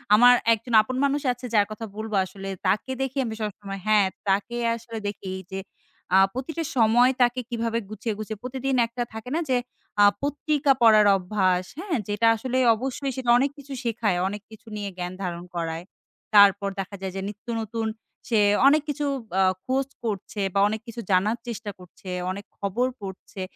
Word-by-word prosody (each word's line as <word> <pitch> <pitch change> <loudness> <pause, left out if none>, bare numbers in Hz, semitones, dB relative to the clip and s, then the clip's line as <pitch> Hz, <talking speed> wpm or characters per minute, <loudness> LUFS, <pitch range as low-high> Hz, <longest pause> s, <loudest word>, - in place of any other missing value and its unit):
আমার 245 +3 +8 0.2
একজন 230 +2 -4
আপন 255 +4 -5
মানুষ 285 +1 +1
আছে, 245 +1 -10
যার 205 -1 +5
কথা 220 +1 -5
বলবো 215 -1 -3
আসলে 195 +1 -8 0.2
তাকে 210 +7 +1
দেখি 270 +1 -2
আমি 220 -1 -4
সবসময় 200 -2 -5
হ্যাঁ, 210 -2 +5 0.2
তাকে 200 +5 0 0.2
আসলে 230 0 -8
দেখি 200 -2 -5 0.2
যে 190 - -3 0.6
আ - - +8 0.2
প্রতিটা 315 +6 -3
সময় 240 +2 +5
তাকে 245 +1 +3
কিভাবে 230 -1 -1
গুছিয়ে, 215 +1 -3
গুছিয়ে 215 -1 -6
প্রতিদিন 265 +1 -2
একটা 240 +1 -3
থাকে 220 +2 -7
না - - +1
যে 255 - +3 0.5
আ - - +9 0.2
পত্রিকা 290 0 +1
পড়ার 215 -2 +7
অভ্যাস, 185 -1 +1
হ্যাঁ? 355 -4 -1
যেটা 210 +2 +2
আসলে 255 +3 -2 0.2
অবশ্যই 265 +3 -3
সেটা 255 -2 -2
অনেক 275 +2 +1
কিছু 280 -1 -9
শেখায়। 225 -5 0
অনেক 205 +2 -5
কিছু 220 +1 -15
নিয়ে 205 -1 -3
জ্ঞান 180 0 -4
ধারণ 175 -1 -4
করায়। 165 0 -3 0.5
তারপর 200 -1 +6
দেখা 195 +1 -4
যায় 190 -1 -4
যে - - -2
নিত্য 210 +2 -12
নতুন 225 +1 -3 0.4
সে 225 -3 +3 0.3
অনেক 300 +2 +5
কিছু 295 0 -1 0.3
আ - - +5 0.2
খোঁজ 265 +1 0 0.2
করছে 205 -1 -3
বা - - +4
অনেক 220 +1 -3
কিছু 230 0 -6
জানার 200 +5 +3
চেষ্টা 225 -3 -5
করছে, 180 +1 -12 0.2
অনেক 200 +1 -7
খবর 205 +6 0
পড়ছে। 190 +1 -8
220 Hz, 175 wpm, -25 LUFS, 200-250 Hz, 0.6 s, আ